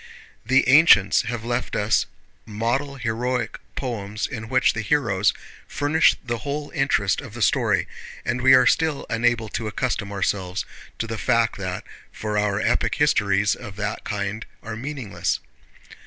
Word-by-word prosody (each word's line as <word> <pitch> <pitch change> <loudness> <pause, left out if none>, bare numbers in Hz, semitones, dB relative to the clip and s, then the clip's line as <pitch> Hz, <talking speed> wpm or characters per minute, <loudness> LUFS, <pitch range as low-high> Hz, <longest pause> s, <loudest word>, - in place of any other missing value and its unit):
The 130 +4 +3
ancients 135 - +6
have 120 -2 -4
left 120 +1 -2
us 105 +1 +2 0.4
model 120 +6 -2
heroic 120 0 -2 0.2
poems 110 -4 -3
in 110 -3 -6
which 130 -1 +3
the 110 - -3
heroes 110 -5 +2 0.4
furnish 145 +3 +3
the 120 -1 -2
whole 145 +4 -4
interest 105 - +1
of - - -11
the - - -6
story, - - +2 0.4
and 125 +1 -1
we 130 +1 +7
are 125 -1 +5
still 160 -1 +1
unable 115 -1 +1
to 110 +2 -3
accustom 110 -2 -2
ourselves 95 -1 -2 0.3
to - - -2
the 115 -1 -5
fact 115 -1 +1
that 90 -1 -4 0.3
for 105 -1 -4
our 105 -1 0
epoch - - +1
histories 100 0 +2
of 110 -6 -9
that 105 0 -4
kind 100 +2 -4 0.2
are 110 -1 -5
meaningless. 130 -3 -3
115 Hz, 150 wpm, -23 LUFS, 105-130 Hz, 0.4 s, we